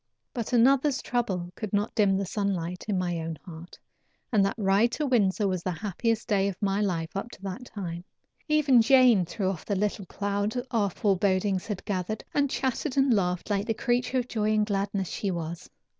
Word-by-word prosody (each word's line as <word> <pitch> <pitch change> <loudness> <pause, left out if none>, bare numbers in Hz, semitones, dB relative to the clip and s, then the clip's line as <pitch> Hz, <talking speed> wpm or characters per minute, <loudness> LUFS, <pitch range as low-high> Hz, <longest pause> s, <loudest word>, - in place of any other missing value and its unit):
But 235 -4 -4
another's 265 +3 +4
trouble 190 -8 -2
could 215 -3 -6
not 205 +2 0
dim 200 -3 +3
the 195 - -1
sunlight 180 -3 -2
in 205 -3 0
my 175 -2 -1
own 160 0 -4
heart, 170 -1 -10 0.5
and 210 -4 +4
that 195 - 0
ride 205 +3 +3
to 300 - -1
Windsor 210 -6 +2
was 185 -2 -1
the 185 - -2
happiest 215 +5 -2
day 200 -3 +2
of 195 -2 -4
my 200 0 0
life 170 -5 -2
up 200 +5 -3
to - - -13
that 200 +6 -5
time. 175 -6 -6 0.4
Even 295 -6 +5
Jane 245 -6 +5
threw 190 +3 -3
off 185 -4 -2
the 200 - -2
little 200 -1 -1
cloud 205 +3 -2 0.2
our 210 -4 +2
forebodings 190 0 +1
had 210 -4 -5
gathered, 200 +2 -3
and 285 -1 +2
chatted 265 +2 -2
and 270 -2 +4
laughed 180 -1 0
like 205 0 0
the 225 - 0
creature 245 +2 0
of 250 -1 -1
joy 215 -3 0
and 215 0 +3
gladness 200 -2 -1
she 200 - -3
was. 170 -2 -5
205 Hz, 195 wpm, -27 LUFS, 185-230 Hz, 0.5 s, Even